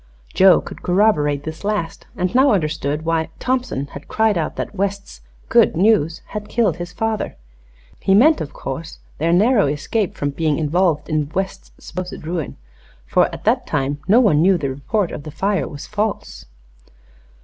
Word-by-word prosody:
Joe 185 -3 +6
could - - -10
corroborate 165 -7 +2
this 160 +3 -7
last, 200 -5 -3
and 180 +3 -1
now 265 +3 +5
understood 155 -3 -1
why 165 -1 0
Thompson 250 - -1
had 140 +1 -11
cried 220 -1 +2
out 165 -3 -2
that - - -4
West's 200 0 -4 0.3
"good 230 -8 +4
news" 175 -5 +2
had 210 -1 -6
killed 210 -9 +1
his 175 0 -6
father. 225 - -2 0.6
He 195 - +3
meant, 305 +9 +5
of 145 - -5
course, 160 +5 -6 0.2
their 165 +3 +1
narrow 205 - +4
escape 155 +8 -1
from 145 0 -2
being 155 0 0
involved 165 +1 +1
in 150 -2 -1
West's 190 0 -3
supposed 180 -3 -7
ruin, 165 -3 -4 0.5
for - - +2
at - - -9
that - - +1
time 140 +2 -1
no 215 +5 +6
one 180 -12 +4
knew 185 +2 +4
the 140 -5 -2
report 170 +8 -1
of - - -6
the 155 - -8
fire 190 0 -1
was 145 - -8
false. 205 - -3
175 Hz, 170 wpm, -20 LUFS, 150-210 Hz, 0.6 s, Joe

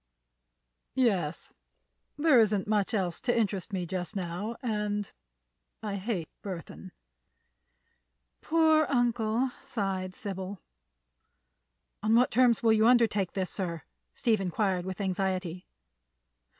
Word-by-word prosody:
"Yes; 190 - 0 0.6
there 295 -4 +5
isn't 210 -3 +3
much 210 -2 +1
else 185 -6 -1
to 245 -1 +1
interest 205 -3 -1
me 185 -3 -2
just 180 +3 -4
now, 190 +5 -3
and—I 205 - -5
hate 190 -5 -2
Burthon." 180 -6 -7 1.5
"Poor 315 -2 +4
uncle!" 240 -1 +1
sighed 195 -8 -3
Sybil. 195 -1 -5 1.4
"On 215 +2 +3
what 250 +2 +4
terms 240 -1 +4
will 225 -1 +5
you 220 +1 +4
undertake 225 -6 +3
this, 190 -2 -2
sir?" 170 -4 -4 0.3
Steve 225 -5 +1
inquired, 185 -1 0
with 190 -1 -5
anxiety. 185 -2 -2
205 Hz, 105 wpm, -29 LUFS, 185-230 Hz, 1.5 s, there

